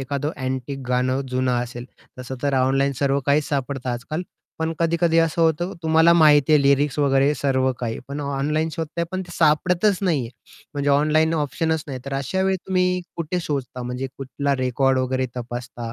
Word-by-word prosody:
एखादं 140 +2 -2
अँटिक 130 +1 -3
गाणं 125 +1 +1
जुनं 130 0 0
असेल, 120 0 -7 0.3
तसं 125 +1 -6
तर 140 -1 +1
ऑनलाईन 135 +2 +2
सर्व 140 0 +2
काहीच 145 +1 +2
सापडतं 135 -2 -3
आजकाल, 125 +8 -4 0.4
पण 160 0 -1
कधी-कधी 165 0 +2
असं 165 0 +2
होतं 165 +3 +1
तुम्हाला 160 +1 +5
माहिती 150 -3 +5
आहे 150 -2 +5
लिरिक्स 140 +1 +2
वगैरे 140 0 +3
सर्व 130 -1 +1
काही. 115 -2 -3
पण 140 +1 -4
ऑनलाईन 145 +3 -1
शोधताय, 165 +2 -3
पण 185 0 -2
ते 175 - -12
सापडतच 180 +5 +3
नाहीये. 150 -11 0 0.5
म्हणजे 145 0 0
ऑनलाईन 155 +3 +3
ऑप्शनच 160 +1 -1
नाही. 135 -3 -5
तर 140 0 -4
अशा 140 +8 -1
वेळी 190 0 +2
तुम्ही 180 -1 +1 0.2
कुठे 170 +2 -2
शोधता? 135 -5 -4
म्हणजे 125 +2 -4
कुठला 140 +1 -2
रेकॉर्ड 130 +1 +1
वगैरे 130 0 0
तपासता 120 -1 -6
140 Hz, 170 wpm, -22 LUFS, 130-160 Hz, 0.5 s, तुम्हाला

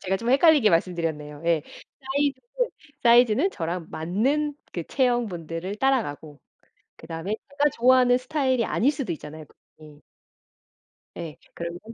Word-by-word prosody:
제가 190 0 0
좀 230 +5 -2
헷갈리게 280 -5 +5
말씀드렸네요. 165 -4 -1
예. 165 -3 +2 0.4
사이즈는, 285 - -2 0.3
사이즈는 240 - +5
저랑 170 - -4
맞는 260 - 0 0.2
그 170 - -4
체형 245 - +1
분들을 175 +1 -5
따라가고 185 - -1 0.6
그다음에 165 +5 -4
제가 285 +1 +2
좋아하는 250 0 +5
스타일이 260 -3 0
아닐 255 +7 +2
수도 270 - -4
있잖아요 155 0 -8
그분이. 150 0 -19 1.1
예. 165 -3 -7 0.2
그러면 170 +1 -6
215 Hz, 325 characters per minute, -25 LUFS, 165-265 Hz, 1.1 s, 헷갈리게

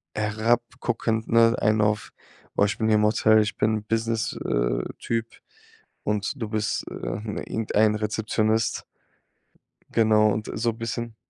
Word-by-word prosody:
herabguckend, 115 +1 -1
ne? 115 0 +5
Einen 110 0 +2
auf: 105 0 0 0.5
„Oh, 100 - +5
ich 105 0 -2
bin 110 - +1
hier 110 - +4
im 105 - +3
Hotel, 110 0 +4
ich 105 - -4
bin 110 -1 +1
Business, 115 0 -1
äh, - - 0 0.2
Typ 115 -1 -2 0.8
und 105 +2 -1
du 110 -4 -4
bist, 105 -1 -1
äh, - - -9
irgendein 105 0 -1
Rezeptionist.“ 110 +1 0 1.1
Genau 110 -2 +4
und 110 +1 -4
so 115 +1 0
'n 115 - -9
bisschen 115 0 -4
110 Hz, 140 wpm, -25 LUFS, 105-115 Hz, 1.1 s, ne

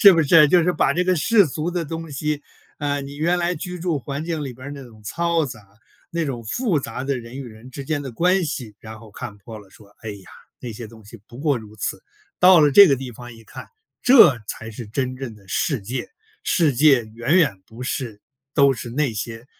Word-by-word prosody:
是 200 -3 +10
不 165 - +3
是， 150 +1 +6
就 175 +2 +5
是 180 - +2
把 155 - +2
这 180 +2 +1
个 185 0 +3
世 195 +4 +4
俗 155 +4 -3
的 175 -2 -2
东 165 +1 -6
西， 150 +1 -2 0.4
呃， 145 -1 -1
你 140 +1 -9
原 170 +4 +1
来 175 +1 0
居 180 +2 -6
住 165 -3 -1
环 140 +3 -5
境 165 -3 -3
里 135 -3 -5
边 130 +4 -9
儿 - - -7
那 140 -1 -8
种 110 -3 -16
嘈 170 +7 0
杂， 105 -5 -11 0.4
那 170 -1 -1
种 125 -5 -4
复 185 - 0
杂 130 0 -5
的 135 -1 -1
人 115 +1 -10
与 140 - -6
人 115 +2 -12
之 140 +1 -7
间 150 +1 -1
的 135 - -6
关 180 +9 +2
系， 130 -8 -5
然 110 0 -10
后 110 -1 -14
看 110 0 -8
破 110 +2 -10
了 100 - -15
说： 100 +1 -19
“哎 110 - -7
呀， 100 -2 -8 0.4
那 120 - -6
些 115 +2 -8
东 110 0 -16
西 105 +1 -13
不 120 - -12
过 145 -4 +1
如 110 -1 -13
此。” - - -4 0.4
到 180 -1 +8
了 150 -2 +5
这 200 +5 +9
个 135 - +3
地 130 -1 -7
方 120 +2 -10
一 115 0 -16
看， - - -11 0.3
这 225 - +7
才 115 0 -6
是 115 +1 -8
真 130 +4 -2
正 130 -4 -7
的 100 -2 -19
世 135 - 0
界。 125 +6 -4 0.3
世 170 - +2
界 135 -2 +5
远 115 +9 0
远 130 - +2
不 115 +3 -10
是 125 -5 -4 0.4
都 140 -2 +5
是 120 -1 -7
那 135 +1 0
些， 115 +3 -6
135 Hz, 255 characters per minute, -22 LUFS, 115-160 Hz, 0.4 s, 是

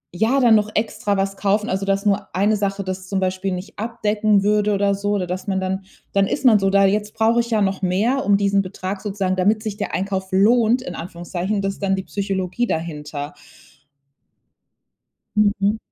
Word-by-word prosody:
ja 225 +8 +2
dann 240 -4 +6
noch 210 0 +1
extra 210 -2 -1
was 195 0 -1
kaufen 205 +3 +1
also, 190 -1 -1
dass 195 0 0
nur 205 -1 0
eine 205 +3 +2
Sache 200 -1 -2
das 185 0 -5
zum 195 0 -1
Beispiel 185 +1 -1
nicht 180 +4 -7
abdecken 215 -2 +1
würde 210 0 +2
oder 200 0 +1
so, 205 +1 -2
oder 195 -3 -1
dass 185 +1 -4
man 190 -1 0
dann 190 +1 -3 0.3
dann 195 0 +3
ist 280 - -3
man 230 -4 +7
so 195 -1 +1
da. 195 0 +5
Jetzt 210 +2 0
brauche 225 +1 +2
ich 235 0 -7
ja 220 -2 +2
noch 195 -1 -1
mehr, 215 +9 +1
diesen 200 0 +2
Betrag 190 +1 -5
sozusagen 195 -3 -1
damit 205 +4 +2
sich 215 -2 -5
der 205 - -4
Einkauf 190 0 -2
lohnt, 225 +5 +4
in 265 - -7
Anführungszeichen, 175 +4 -4
das 195 0 -1
ist - - -12
dann 195 -1 +2
die 190 - -4
Psychologie 195 +2 -2
dahinter. 150 -4 -4 2.0
Mhm. 205 0 +2
200 Hz, 190 wpm, -21 LUFS, 190-210 Hz, 2.0 s, man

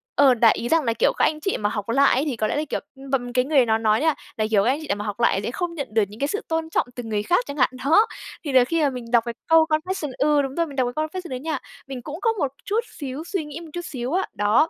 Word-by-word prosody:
ờ, 275 -3 +6
đại 230 -1 +5
ý, 240 - -3
rằng 325 -2 +3
là, 230 -2 +1
kiểu: - - +2
"Các - - +4
anh 305 - 0
chị 390 +5 -1
mà 205 0 0
học 210 0 -4
lại 275 +3 +4
ấy 270 - +1
thì 275 -6 -2
có 215 -1 0
lẽ - - -1
là 300 - 0
kiểu" - - -1 0.2
ưm, 270 0 -11
bầm 245 -2 -1
cái 250 +1 +2
người 275 -4 +4
nó 220 -1 +2
nói 220 +2 +2
nha 320 -1 +3 0.2
là, 215 - +1
kiểu 200 -2 +4
"các 240 - +2
anh 280 +4 +1
chị 310 - -8
nào 200 - +1
mà 205 +1 -5
học 210 +2 -4
lại 205 -4 +3
sẽ 235 - -2
không 350 +3 -3
nhận 285 -4 -4
được 220 -2 +4
những 210 +2 -13
cái 280 - +1
sự 415 +9 -2
tôn 320 0 -1
trọng 320 - 0
từ 245 - -5
người 210 -2 -2
khác" 355 - +2
chẳng 285 - -6
hạn, 255 - +4 0.2
đó. 410 +10 +6 0.4
Thì 290 - -3
là 255 -1 +7
khi 330 +5 0
mà 290 - +3
mình 250 -3 -6
đọc 235 -2 +4
cái 235 - -3
câu 325 -1 +6
confession 310 -1 -1
ừ 295 0 +3
đúng 270 0 -4
rồi, 335 0 +1
mình 280 - -10
đọc 255 -2 +1
cái 310 0 0
confession 355 +1 -7
đấy 255 - -4
nha, 310 +1 -2 0.3
mình 260 -2 -6
cũng 310 +8 -7
có 455 - +3
một 330 -10 0 0.2
chút 425 +3 +1 0.2
xíu 280 +2 -5
suy 345 -3 -3
nghĩ 295 +1 -8
một 330 -2 -10
chút 350 +1 -5
xíu 255 +2 -4
á. 380 - +1
Đó, 210 - +3
275 Hz, 325 wpm, -23 LUFS, 240-320 Hz, 0.4 s, là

